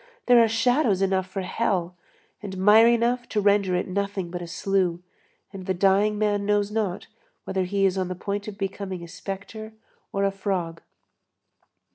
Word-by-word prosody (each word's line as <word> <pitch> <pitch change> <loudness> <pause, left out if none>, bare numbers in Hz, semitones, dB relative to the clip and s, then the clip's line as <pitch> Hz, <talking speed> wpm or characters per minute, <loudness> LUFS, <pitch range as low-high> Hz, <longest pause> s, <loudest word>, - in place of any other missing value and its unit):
There 245 -1 +6
are - - +3
shadows 225 -3 +2
enough 190 -1 0
for 195 +1 -4
hell, 185 -3 -1 0.5
and 195 -3 -6
mire 210 +4 +6
enough 240 +1 +1
to 210 - 0
render 200 -2 +2
it 180 - -1
nothing 195 -2 -3
but 175 0 -5
a 175 - -6
slough, 185 0 0 0.6
and 190 -2 -8
the 190 - 0
dying 200 +3 +3
man 205 -1 0
knows 205 0 +1
not 210 -5 -2 0.4
whether 190 -1 -2
he 195 +1 +1
is 190 0 +1
on 185 - -1
the 185 - -4
point 200 +3 -4
of 205 -2 -7
becoming 195 -2 -4
a - - -8
spectre 205 +5 -7 0.4
or 195 - -1
a 195 - +2
frog. 185 -4 -3
195 Hz, 175 wpm, -25 LUFS, 185-210 Hz, 0.6 s, There